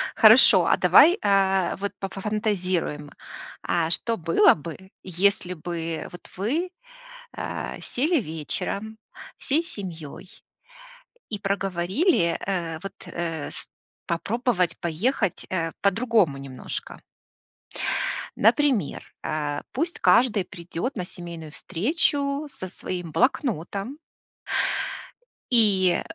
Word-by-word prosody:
Хорошо, -, -, +8 dB
а -, -, +3 dB
давай, 345 Hz, +7 st, +7 dB
а, 195 Hz, -2 st, +2 dB
вот 200 Hz, 0 st, -2 dB
пофа 195 Hz, 0 st, -5 dB
фантазируем. 185 Hz, -8 st, -1 dB, 0.5 s
А 165 Hz, -2 st, +1 dB
что 230 Hz, +7 st, 0 dB
было 165 Hz, 0 st, +5 dB
бы, 170 Hz, +5 st, -9 dB
если 185 Hz, +1 st, +1 dB
бы 165 Hz, -1 st, -4 dB
вот 175 Hz, -, -12 dB
вы, 295 Hz, -, -1 dB, 0.6 s
а, -, -, -5 dB
сели 305 Hz, +5 st, 0 dB
вечером 200 Hz, +6 st, -4 dB, 0.4 s
всей 300 Hz, +4 st, 0 dB
семьей 180 Hz, -, -8 dB, 1.0 s
и 210 Hz, -, -4 dB
проговорили, 195 Hz, -, +1 dB
э, 170 Hz, -4 st, -2 dB
вот, 195 Hz, -, -6 dB
э, 165 Hz, -3 st, -4 dB
с -, -, -9 dB, 0.4 s
попробовать 185 Hz, -, 0 dB
поехать, 195 Hz, -, -1 dB
э, 165 Hz, -3 st, -1 dB
по-другому 205 Hz, -, +2 dB
немножко? 135 Hz, -2 st, -7 dB, 1.4 s
Например, 235 Hz, -, +2 dB, 0.2 s
а, 150 Hz, -1 st, -2 dB
пусть 330 Hz, +6 st, -2 dB
каждый 230 Hz, -5 st, +4 dB
придет 180 Hz, +7 st, -5 dB
на 185 Hz, -, -2 dB
семейную 170 Hz, -4 st, -9 dB
встречу 280 Hz, -, 0 dB
со 265 Hz, -10 st, -6 dB
своим 175 Hz, -2 st, -6 dB
блокнотом 200 Hz, -, 0 dB, 1.5 s
и 200 Hz, -6 st, +5 dB
190 Hz, 100 wpm, -25 LUFS, 170-230 Hz, 1.5 s, Хорошо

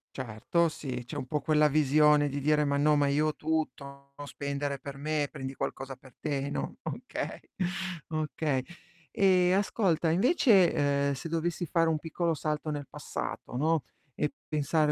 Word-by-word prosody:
Certo, 130 Hz, +8 st, 0 dB
sì, 125 Hz, -5 st, -5 dB
c'è 145 Hz, -, -8 dB
un 130 Hz, -2 st, -4 dB
po' 150 Hz, -, 0 dB
quella 150 Hz, +1 st, +3 dB
visione 150 Hz, 0 st, +4 dB
di 140 Hz, +1 st, -3 dB
dire: 150 Hz, +1 st, +3 dB
"Ma 140 Hz, 0 st, +1 dB
no, 150 Hz, +1 st, +4 dB
ma 145 Hz, -1 st, +3 dB
io 150 Hz, +2 st, +2 dB
ho 155 Hz, -, -1 dB
tutto, 140 Hz, -3 st, -3 dB
no 145 Hz, -, -7 dB
spendere 140 Hz, -1 st, -3 dB
per 140 Hz, -1 st, -8 dB
me, 150 Hz, 0 st, 0 dB
prendi 135 Hz, 0 st, -5 dB
qualcosa 135 Hz, 0 st, -4 dB
per 130 Hz, -1 st, -18 dB
te," 140 Hz, -2 st, -2 dB
no, -, -, -4 dB
okay, -, -, -5 dB, 0.7 s
okay. 155 Hz, -4 st, -1 dB, 0.5 s
Ehm, 185 Hz, -2 st, +4 dB
ascolta, 180 Hz, -6 st, +1 dB
invece, 195 Hz, -, +5 dB, 0.4 s
ehm, -, -, 0 dB
se 160 Hz, +5 st, -6 dB
dovessi 165 Hz, +1 st, -1 dB
fare 165 Hz, 0 st, +2 dB
un 155 Hz, -1 st, +1 dB
piccolo 165 Hz, +1 st, -1 dB
salto 150 Hz, 0 st, -2 dB
nel 145 Hz, -2 st, -4 dB
passato, -, -, -5 dB
no, 155 Hz, +3 st, +2 dB, 0.3 s
e 150 Hz, -, 0 dB, 0.2 s
pensare 150 Hz, 0 st, +1 dB
150 Hz, 165 wpm, -29 LUFS, 140-160 Hz, 0.7 s, invece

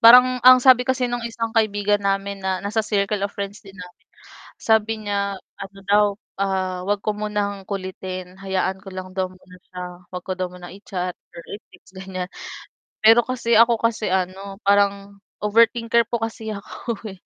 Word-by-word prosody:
parang 250 Hz, +2 st, +8 dB
ang 255 Hz, 0 st, +9 dB
sabi 255 Hz, 0 st, +5 dB
kasi 255 Hz, -1 st, +1 dB
nung 245 Hz, 0 st, -2 dB
isang 230 Hz, -1 st, -4 dB
kaibigan 205 Hz, -2 st, +2 dB
namin 195 Hz, 0 st, -1 dB
na 190 Hz, 0 st, -2 dB
nasa 215 Hz, +2 st, 0 dB
circle 205 Hz, -1 st, 0 dB
of 200 Hz, -, 0 dB
friends 200 Hz, +1 st, -5 dB
din 195 Hz, -1 st, -15 dB
namin, 180 Hz, -2 st, -12 dB, 0.6 s
sabi 220 Hz, 0 st, +2 dB
niya, 200 Hz, -1 st, -1 dB, 0.2 s
ano 195 Hz, 0 st, -8 dB
daw, 205 Hz, +1 st, +4 dB, 0.4 s
ah, 190 Hz, -2 st, -1 dB
huwag 205 Hz, 0 st, 0 dB
ko 215 Hz, -, +1 dB
munang 205 Hz, -2 st, -3 dB
kulitin 185 Hz, -1 st, -6 dB
hayaan 190 Hz, 0 st, -1 dB
ko 195 Hz, -, -12 dB
lang 185 Hz, 0 st, -7 dB
daw 185 Hz, -1 st, -1 dB
muna 185 Hz, 0 st, -17 dB
siya. 180 Hz, 0 st, -7 dB, 0.3 s
'Wag 180 Hz, -1 st, -7 dB
ko 190 Hz, -, -3 dB
daw 185 Hz, -1 st, -3 dB
munang 180 Hz, -1 st, -11 dB
i-chat, 185 Hz, -2 st, -4 dB
or 170 Hz, -, -14 dB
i-text, 190 Hz, -3 st, -13 dB
ganyan. 190 Hz, -1 st, -6 dB, 0.7 s
Pero 225 Hz, +2 st, +6 dB
kasi 235 Hz, -2 st, 0 dB
ako 230 Hz, 0 st, +5 dB
kasi 225 Hz, -4 st, 0 dB
ano, 190 Hz, +2 st, -2 dB
parang 200 Hz, 0 st, +2 dB, 0.2 s
overthinker 230 Hz, +2 st, +3 dB
po 235 Hz, -, 0 dB
kasi 225 Hz, -1 st, -4 dB
ako 205 Hz, +3 st, -6 dB, 0.2 s
eh. 190 Hz, -3 st, -11 dB
200 Hz, 170 wpm, -22 LUFS, 190-225 Hz, 0.7 s, ang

